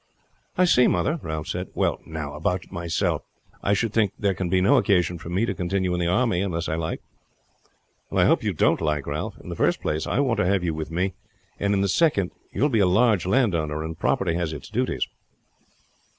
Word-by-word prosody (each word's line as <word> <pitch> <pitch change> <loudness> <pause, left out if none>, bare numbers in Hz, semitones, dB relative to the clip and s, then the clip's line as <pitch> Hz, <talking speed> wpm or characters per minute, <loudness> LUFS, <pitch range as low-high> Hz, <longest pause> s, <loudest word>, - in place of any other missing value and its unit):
"I 185 - +5
see, 125 -8 +5
mother," 155 +3 +1
Ralph 80 -1 -4
said. 90 +1 -4
"Well, - - +1
now, 80 -2 -5
about 90 +4 -2
myself; 85 -2 -1 0.4
I 100 - +2
should 110 0 -1
think 105 -3 +2
there 100 -2 +1
can 90 -1 -3
be 95 +1 +3
no 125 +10 +4
occasion 90 -6 +2
for 80 - -8
me 95 +6 +1
to - - -2
continue 90 0 -1
in 90 - -1
the 85 - 0
army 90 0 +2
unless 85 -4 -2
I - - -1
like?" 80 0 -3 1.1
"I - - +3
hope - - +4
you - - -1
won't - - +3
like, 75 -3 0
Ralph. - - -4
In - - -11
the - - -4
first - - +1
place 75 +1 -2
I - - 0
want 130 -5 +1
to 105 - +2
have 95 -1 +2
you 85 -2 0
with 80 0 -5
me; 90 +3 -1 0.5
and 100 0 +1
in 95 - +1
the 100 - +2
second, 100 - +2 0.2
you - - -1
will 145 - +4
be 115 -5 +2
a 100 - +4
large 105 -1 +3
landowner, 85 - +1
and 80 0 -5
property 90 0 0
has 85 -2 -2
its 75 +2 -8
duties." 125 +5 -1
90 Hz, 220 wpm, -24 LUFS, 85-105 Hz, 1.1 s, I